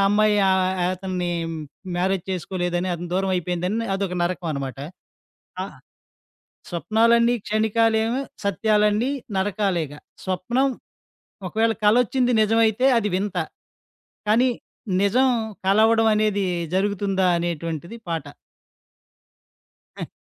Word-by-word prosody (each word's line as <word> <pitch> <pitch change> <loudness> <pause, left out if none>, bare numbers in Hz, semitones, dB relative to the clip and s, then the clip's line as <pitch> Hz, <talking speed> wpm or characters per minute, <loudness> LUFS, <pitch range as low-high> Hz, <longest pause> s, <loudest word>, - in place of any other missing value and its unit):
అమ్మాయి 210 +1 +3
ఆహ్, 190 0 +3 0.2
య 175 - +2
అతన్ని 180 -1 -3 0.7
మ్యారేజ్ 185 0 0
చేసుకోలేదని, 175 0 -2
అతనికి 175 0 -7
దూరం 190 0 0
అయిపోయిందని, 180 +6 -2
అదొక 195 -2 -2
నరకం 175 -1 -2
అనమాట. 135 -1 -5 0.9
ఆహ్, - - -9 0.9
స్వప్నాలన్నీ 230 +6 +3
క్షణికాలేమో, 220 +2 +1 0.2
సత్యాలన్నీ 210 +4 +2 0.3
నరకాలేగా. 190 -7 -1 0.3
స్వప్నం 235 +9 0 0.8
ఒకవేళ 225 +4 +1
కలొచ్చింది 245 +3 +3
నిజమైతే 225 +3 +3
అది 210 -2 0
వింత. 195 -1 -2 0.9
కానీ 240 +4 +4 0.5
నిజం 250 +7 +3 0.4
కలవడం 225 +2 +4
అనేది 210 -2 +1 0.3
జరుగుతుందా? 195 -1 +1
అనేటువంటిది 170 +3 -4
పాట. 160 -4 -3 1.7
ఆ! - - -6
200 Hz, 90 wpm, -23 LUFS, 180-225 Hz, 1.7 s, కానీ